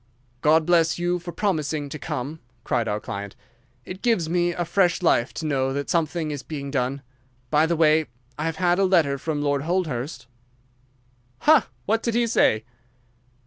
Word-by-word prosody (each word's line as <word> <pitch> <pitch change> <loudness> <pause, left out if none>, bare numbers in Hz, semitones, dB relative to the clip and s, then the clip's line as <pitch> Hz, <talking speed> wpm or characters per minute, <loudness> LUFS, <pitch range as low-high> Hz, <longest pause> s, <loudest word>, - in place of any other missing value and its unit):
"God 155 +1 +4
bless 165 -1 +3
you 175 +1 0
for 175 0 -7
promising 155 -7 -1
to 150 - -7
come," 140 +5 -4 0.2
cried 120 -3 0
our 105 0 -1
client. 100 -1 -6 0.5
"It 185 +1 -8
gives 225 -9 +1
me 175 +1 +1
fresh 175 +1 +1
life 120 -7 +3
to 160 - -4
know 135 -3 0
that 140 +1 -3
something 165 -1 0
is 145 -2 -4
being 140 -3 -6
done. 135 +1 -1 0.5
By 155 +1 +4
the 170 - +1
way, 155 -1 +3 0.3
I 150 +4 -3
have 165 -1 -1
had 175 +2 +2
a 195 - +4
letter 160 -7 +2
from 150 0 -2
Lord 145 -1 +1
Holdhurst." 155 -6 -2 1.2
"Ha! 310 -1 +5 0.2
What 225 +2 +1
did 230 -2 -1
he 240 0 +3
say?" 110 - +2
160 Hz, 170 wpm, -24 LUFS, 140-175 Hz, 1.2 s, Ha